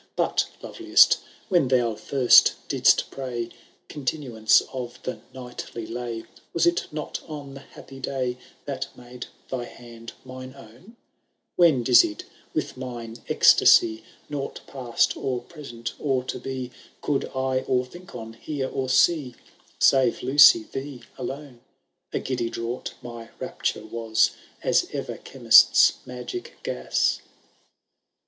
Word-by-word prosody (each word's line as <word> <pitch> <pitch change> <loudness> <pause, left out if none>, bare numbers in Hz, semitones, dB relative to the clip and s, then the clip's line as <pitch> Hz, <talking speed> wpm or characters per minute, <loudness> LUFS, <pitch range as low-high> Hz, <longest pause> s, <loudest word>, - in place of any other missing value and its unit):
But, - - +1 0.2
loveliest, 340 0 +4 0.3
when 175 -8 +3
thou 120 -3 +2
first 125 +3 +5
didst - - +3
pray 120 -3 -4 0.4
Continuance 130 -6 +1
of 125 -2 -6
the 130 - -5
knightly 125 -2 -8
lay, 115 0 -5 0.3
Was 170 - +3
it 170 0 +1
not 150 -1 -5
on 145 -3 -8
the 135 - -9
happy 135 -1 -13
day 130 -2 -3 0.3
That 135 -1 -4
made 125 0 -10 0.2
thy 125 -2 -3
hand 115 -1 -12
mine 130 0 -9
own? 135 - -16 0.6
When, 160 -8 +4
dizzied 120 -3 +4 0.3
with - - -3
mine 120 -3 -7
ecstasy. 110 0 +5 0.2
Nought 140 -2 -5
past, 125 -3 0
or 130 -2 -2
present, 120 -7 -8
or 135 -3 0
to 130 - -5
be. 130 -2 -5 0.3
Could 145 -2 0
I 130 0 0
or 125 -1 +1
think 175 +5 -13
on, 115 -2 -8
hear, 135 +3 -4
or 130 -1 -3
see. 130 -1 +3 0.4
Save, 130 -3 +3
Lucy, 145 - +7
thee 135 -2 -6
alone! 135 0 -7 0.5
A - - -2
giddy 120 -3 -2
draught 115 +2 -5
my 120 -1 -9
rapture - - -3
was. 115 -1 +1 0.3
As - - +2
ever - - -5
chemist^s - - +5
magic 125 - -7
gas. - - 0
130 Hz, 125 wpm, -25 LUFS, 120-140 Hz, 0.6 s, Lucy